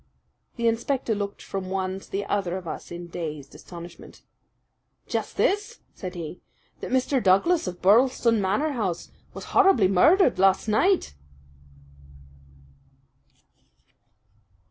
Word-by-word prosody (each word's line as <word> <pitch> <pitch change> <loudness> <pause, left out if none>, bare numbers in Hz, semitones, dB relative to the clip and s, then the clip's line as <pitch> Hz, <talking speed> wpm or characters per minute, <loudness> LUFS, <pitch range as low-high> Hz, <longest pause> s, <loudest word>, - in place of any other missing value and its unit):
The 235 -1 0
inspector 235 +1 0
looked 200 -1 -5
from 190 -1 -5
one 190 0 -2
to - - -17
the 200 +1 -3
other 190 -3 -1
of 180 -2 -9
us - - -6
in 175 0 -7
dazed 155 -5 -6
astonishment. 175 0 -12 0.8
"Just - - -4
this," 415 +4 0
said 185 -1 -7
he, 170 0 -7 0.4
"that - - -6
Mr. 260 +1 +1
Douglas 200 - +3
of 180 -1 -7
Birlstone 230 +2 +4
Manor 210 +12 0
House 200 -10 -3 0.2
was - - -7
horribly 385 - +5
murdered 260 - +4
last 195 +2 +3
night!" 350 - +2
200 Hz, 120 wpm, -25 LUFS, 185-260 Hz, 0.8 s, horribly